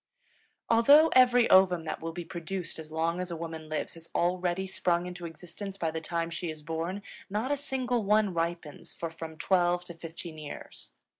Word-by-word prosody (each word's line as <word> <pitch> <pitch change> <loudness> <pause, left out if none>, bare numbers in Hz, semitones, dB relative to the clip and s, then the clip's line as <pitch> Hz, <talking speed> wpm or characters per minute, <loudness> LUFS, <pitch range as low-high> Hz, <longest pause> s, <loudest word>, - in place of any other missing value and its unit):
Although 285 +8 +7
every 245 -2 +6
ovum 185 -3 +6
that 160 - -4
will 165 0 -3
be 175 0 -6
produced 170 0 -4
as 155 -1 -9
long 165 +2 0
as 180 0 -3
a 170 - -3
woman 160 -1 -6
lives 155 - -2
has 165 0 -13
already 180 +1 +1
sprung 180 -2 0
into 180 -1 -6
existence 185 +4 -8
by 165 -4 -1
the 160 0 -4
time 170 +1 -2
she 170 0 -3
is 155 -1 -7
born, 165 +5 -3 0.3
not 215 +7 -1
a - - +3
single 255 -4 -1
one 210 -1 +3
ripens 170 -2 -3
for 165 -1 -4
from 160 -1 -8
twelve 175 0 +2
to 175 - -8
fifteen 165 -1 -8
years. 150 -1 -8
175 Hz, 190 wpm, -29 LUFS, 165-195 Hz, 0.3 s, Although